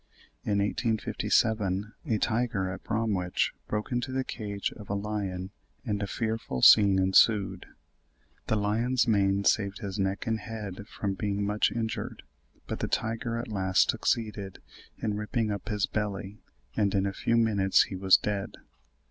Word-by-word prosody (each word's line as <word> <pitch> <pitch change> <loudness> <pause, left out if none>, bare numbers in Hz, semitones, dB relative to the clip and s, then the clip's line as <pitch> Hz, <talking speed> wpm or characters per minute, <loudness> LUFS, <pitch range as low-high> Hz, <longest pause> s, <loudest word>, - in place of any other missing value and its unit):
In 100 - 0
1857 105 -1 0
a 110 -5 +2
tiger 110 -4 0
at 95 - -8
Bromwich 105 -6 0 0.2
broke 105 +3 -3
into 125 +1 -1
the 130 0 0
cage 100 -5 -4
of 105 - -12
a 100 - 0
lion 100 -2 -3 0.3
and 105 -3 -1
a 100 - -1
fearful 110 - -3
scene 100 -2 +8
ensued: 95 0 +3 0.8
"the - - +1
lion's 115 +5 +1
mane 100 -2 +2
saved 100 -1 +2
his 100 -2 -5
neck 95 +1 -1
and 110 -1 0
head 105 -4 -7
from 100 -3 -3
being 100 +1 -2
much 105 +1 +1
injured, 115 -1 -4 0.4
but - - -5
the - - -1
tiger 115 +1 -2
at 120 - -4
last 95 -3 +2
succeeded 105 -4 -2 0.4
in 105 - -2
ripping 105 +1 -1
up 100 +1 -5
his 105 -2 +1
belly, 105 -1 -4 0.4
and 100 -2 +1
in 95 0 +2
a 100 - -1
few 115 +4 +1
minutes 100 -4 +4
he 95 - -6
was 95 0 +5
dead." 100 -2 -3
105 Hz, 155 wpm, -28 LUFS, 100-110 Hz, 0.8 s, scene